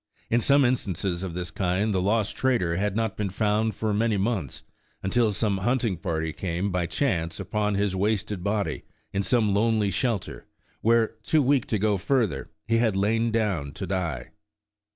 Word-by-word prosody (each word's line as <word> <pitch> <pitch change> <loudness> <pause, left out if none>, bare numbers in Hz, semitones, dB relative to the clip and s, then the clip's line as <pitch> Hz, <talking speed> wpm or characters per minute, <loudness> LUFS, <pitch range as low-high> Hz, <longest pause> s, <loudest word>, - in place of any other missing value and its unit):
In 120 +1 +3
some 140 +3 +4
instances 95 -7 -1
of 90 -3 -5
this 90 -1 -4
kind, 95 +4 0
the 95 - +1
lost 105 +2 +1
trader 115 -11 +1
had 100 +2 -1
not 110 -2 -1
been 105 -2 -2
found 105 +2 0
for 110 0 -1
many 110 0 +1
months, 95 - -2 0.4
until 110 +3 +2
some 100 -1 0
hunting 120 0 +1
party 80 -3 -2
came, 90 +2 -2
by 90 -1 0
chance, 85 - -1
upon 105 +2 -1
his 100 -1 0
wasted 105 -1 -1
body 100 0 -1 0.3
in 100 - +1
some 110 -1 +2
lonely 105 -1 +2
shelter, 110 -1 -2 0.3
where, 115 0 +3
too 155 +6 +2
weak 135 -1 +2
to 110 - 0
go 105 0 +1
further, 120 -1 0 0.2
he 115 0 +2
had 115 -4 +2
lain 110 +4 +2
down 100 -11 -1
to 95 - -5
die. 85 -9 -3
105 Hz, 175 wpm, -26 LUFS, 95-115 Hz, 0.4 s, some